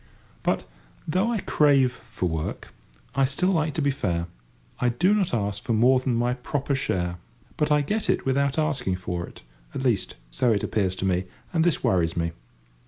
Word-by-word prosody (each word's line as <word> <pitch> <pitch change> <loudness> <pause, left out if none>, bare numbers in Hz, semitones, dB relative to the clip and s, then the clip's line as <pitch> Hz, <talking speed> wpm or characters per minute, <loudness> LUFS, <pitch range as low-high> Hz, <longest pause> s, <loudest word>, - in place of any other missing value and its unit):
But, - - 0 0.4
though 185 +9 +1
I 220 -4 -1
crave 140 -4 +4
for 95 -6 -4
work, 80 -2 -4 0.4
I 135 -1 +2
still 140 +8 +2
like 155 -4 0
to 155 - 0
be 140 - +3
fair. 85 -10 -1 0.5
I 125 - +2
do 175 - +3
not 200 -4 +1
ask 105 -3 -1
for 115 - -1
more 125 +4 +5
than 130 -2 0
my 120 +1 +1
proper 140 +3 -2
share. 90 -10 -1 0.4
But 150 0 0
I 150 0 +5
get 210 +8 -1
it - - +1
without 140 +1 +1
asking 140 -11 0
for 90 -1 -4
it—at - - -10
least, 115 -7 0 0.2
so 115 - +2
it 100 - -1
appears 95 -4 0
to 95 - -3
me—and 95 - -1
this 170 -2 +1
worries 85 -3 +2
me. 85 0 0
125 Hz, 180 wpm, -25 LUFS, 95-150 Hz, 0.5 s, more